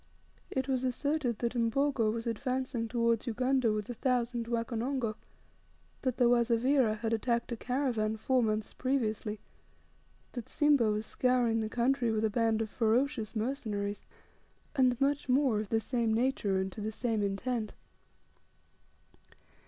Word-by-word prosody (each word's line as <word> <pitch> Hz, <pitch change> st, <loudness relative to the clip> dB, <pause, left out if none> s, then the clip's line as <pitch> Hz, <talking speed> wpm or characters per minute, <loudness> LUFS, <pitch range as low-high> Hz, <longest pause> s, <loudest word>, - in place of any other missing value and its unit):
It 265 Hz, 0 st, -2 dB
was 260 Hz, -2 st, 0 dB
asserted 260 Hz, -1 st, 0 dB
that 235 Hz, +2 st, -1 dB
Mbogo 235 Hz, 0 st, +1 dB
was 230 Hz, +1 st, -4 dB
advancing 250 Hz, 0 st, -2 dB
towards 230 Hz, 0 st, +1 dB
Ugunda 255 Hz, 0 st, +1 dB
with 210 Hz, -1 st, -2 dB
a 245 Hz, -, -4 dB
thousand 240 Hz, -1 st, -1 dB
Wakonongo, 235 Hz, +1 st, -1 dB, 0.9 s
that 255 Hz, -2 st, -1 dB
the 245 Hz, -, +4 dB
Wazavira 240 Hz, 0 st, +3 dB
had 225 Hz, +1 st, -2 dB
attacked 235 Hz, +2 st, 0 dB
a -, -, -1 dB
caravan 235 Hz, -3 st, -1 dB
four 255 Hz, +3 st, +2 dB
months 215 Hz, -1 st, -1 dB
previously, 220 Hz, -5 st, -1 dB, 0.9 s
that 240 Hz, -3 st, -7 dB
Simba 290 Hz, -7 st, +3 dB
was 210 Hz, +1 st, -1 dB
scouring 245 Hz, -3 st, +1 dB
the 215 Hz, -, -2 dB
country 245 Hz, +1 st, +1 dB
with 220 Hz, 0 st, +1 dB
a 215 Hz, -, 0 dB
band 225 Hz, 0 st, +1 dB
of 220 Hz, -, -6 dB
ferocious 235 Hz, 0 st, +1 dB
mercenaries, 215 Hz, -4 st, -2 dB, 0.7 s
and 255 Hz, -3 st, +3 dB
much 280 Hz, 0 st, 0 dB
more 255 Hz, -4 st, +3 dB
of 210 Hz, -2 st, -4 dB
the 225 Hz, -, +2 dB
same 230 Hz, 0 st, 0 dB
nature 230 Hz, -5 st, +1 dB
and 190 Hz, 0 st, -1 dB
to 210 Hz, -, -8 dB
the 215 Hz, +1 st, -2 dB
same 225 Hz, -1 st, -1 dB
intent. 215 Hz, +3 st, -2 dB
235 Hz, 145 wpm, -31 LUFS, 220-255 Hz, 0.9 s, the